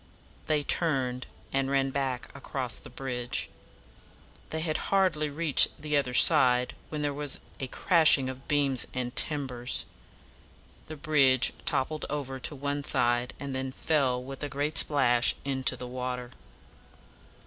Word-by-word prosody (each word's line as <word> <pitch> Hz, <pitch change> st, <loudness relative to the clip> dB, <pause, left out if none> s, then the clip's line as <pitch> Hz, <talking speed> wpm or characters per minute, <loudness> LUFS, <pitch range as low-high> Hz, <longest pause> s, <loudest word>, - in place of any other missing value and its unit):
They 150 Hz, -2 st, +1 dB
turned, 130 Hz, -6 st, -1 dB, 0.3 s
and 135 Hz, 0 st, 0 dB
ran 135 Hz, -1 st, +1 dB
back 135 Hz, -1 st, -3 dB
across 130 Hz, -3 st, -4 dB
the -, -, -13 dB
bridge. 125 Hz, -1 st, -3 dB, 1.0 s
They 160 Hz, -, -4 dB
had 155 Hz, -1 st, -1 dB
hardly 180 Hz, -6 st, +1 dB
reached 150 Hz, 0 st, +4 dB
the 150 Hz, 0 st, -2 dB
other 130 Hz, -3 st, 0 dB
side 125 Hz, +1 st, +5 dB, 0.2 s
when 150 Hz, -1 st, -4 dB
there 145 Hz, -1 st, -1 dB
was 145 Hz, -1 st, -2 dB, 0.2 s
a 135 Hz, -, -4 dB
crashing 155 Hz, -3 st, +3 dB
of 130 Hz, 0 st, -8 dB
beams 140 Hz, -4 st, +2 dB
and 125 Hz, -1 st, -4 dB
timbers. 130 Hz, -5 st, 0 dB, 1.0 s
The 155 Hz, -, -7 dB
bridge 140 Hz, -4 st, +3 dB
toppled 155 Hz, +4 st, -1 dB
over 135 Hz, -3 st, -4 dB
to 145 Hz, -, -1 dB
one 145 Hz, +1 st, -3 dB
side, 120 Hz, -1 st, +1 dB
and 140 Hz, -1 st, -5 dB
then 130 Hz, 0 st, -3 dB
fell 130 Hz, -4 st, 0 dB
with 135 Hz, +1 st, -9 dB
a 145 Hz, -, -3 dB
great 145 Hz, +2 st, +1 dB
splash 120 Hz, -5 st, +3 dB
into 135 Hz, -1 st, -1 dB
the 125 Hz, -, -7 dB
water. 125 Hz, 0 st, -5 dB
135 Hz, 140 wpm, -28 LUFS, 125-150 Hz, 1.0 s, side